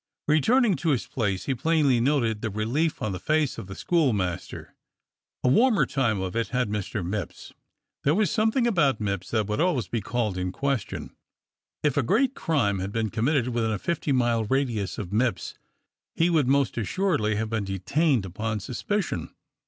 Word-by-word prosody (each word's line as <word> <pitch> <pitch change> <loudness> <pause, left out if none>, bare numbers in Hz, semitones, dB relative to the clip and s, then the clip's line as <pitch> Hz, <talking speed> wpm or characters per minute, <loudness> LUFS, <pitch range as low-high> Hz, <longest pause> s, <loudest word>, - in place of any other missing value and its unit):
Returning 210 - +4
to 160 +4 -1
his 135 -6 +1
place, 100 -6 -2
he 135 - 0
plainly 145 -1 +2
noted 120 -5 +1
the 110 - -2
relief 120 +9 -1
on 110 - -1
the 90 - -4
face 155 - 0
of - - -8
the 95 - -8
schoolmaster. 105 - -1 0.7
A - - +2
warmer 225 - +4
time 115 -7 0
of 95 +2 -4
it 115 0 0
had 125 -4 -1
Mr. 105 -2 -3
Mipps. 95 -1 -5 0.5
There 145 +3 +3
was 210 -3 +2
something 225 +3 +2
about 150 - +2
Mipps 100 -3 -3
that 110 -2 +1
would 105 +7 -1
always 165 -10 +1
be 115 - -2
called 105 -3 -2
in 90 0 -2
question. 135 0 -3 0.7
If 145 -2 +1
a - - +4
great 260 - +2
crime 115 - 0
had 95 +2 -3
been 110 -1 -1
committed 125 +2 +1
within 115 -2 0
a 105 - -1
fifty 155 - -2
mile 120 -3 +2
radius 115 -7 -1
of 100 -1 -6
Mipps, 115 -2 0 0.6
he 170 +2 +2
would 155 -6 +3
most 140 -2 +2
assuredly 115 - 0
have 110 +1 -2
been 110 -2 0
detained 110 - +1
upon 105 +4 -3
suspicion. 130 - -3
120 Hz, 175 wpm, -26 LUFS, 105-150 Hz, 0.7 s, Returning